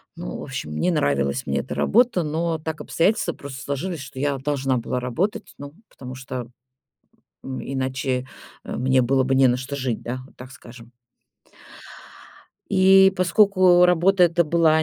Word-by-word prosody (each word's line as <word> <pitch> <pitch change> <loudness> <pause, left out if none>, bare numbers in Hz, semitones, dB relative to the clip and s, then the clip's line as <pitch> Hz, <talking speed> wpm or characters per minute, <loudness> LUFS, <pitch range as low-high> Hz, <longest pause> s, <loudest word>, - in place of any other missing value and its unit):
Ну, - - -6
в - - -8
общем, 75 0 -6
не 180 - +1
нравилась 70 - 0
мне - - -1
эта - - -5
работа, 230 -6 +2
но 160 +2 -2
так 160 0 -6
обстоятельства 200 +6 0
просто 135 -1 -9
сложились, 155 +4 -4
что 135 -1 -9
я 140 -1 0
должна 135 -1 -1
была 120 +2 -3
работать, 195 - -3
ну, 145 +1 -10 0.2
потому, 130 -1 -10 1.3
м, 130 -1 -6
иначе, 130 -1 -3 0.4
э, - - -5
мне 130 +1 +2
было 130 +2 +2
бы 135 +1 0
не 135 0 +5
на 125 - +2
что 130 +2 -6
жить, 130 -5 -3
да, 125 +2 -5
вот - - -23
так 130 +1 -11
скажем. 120 -1 -14 1.8
И 190 0 +6
поскольку 185 -1 +4
работа 180 +2 +4
эта 170 0 +2
была 160 0 +3
140 Hz, 160 wpm, -22 LUFS, 130-175 Hz, 1.8 s, И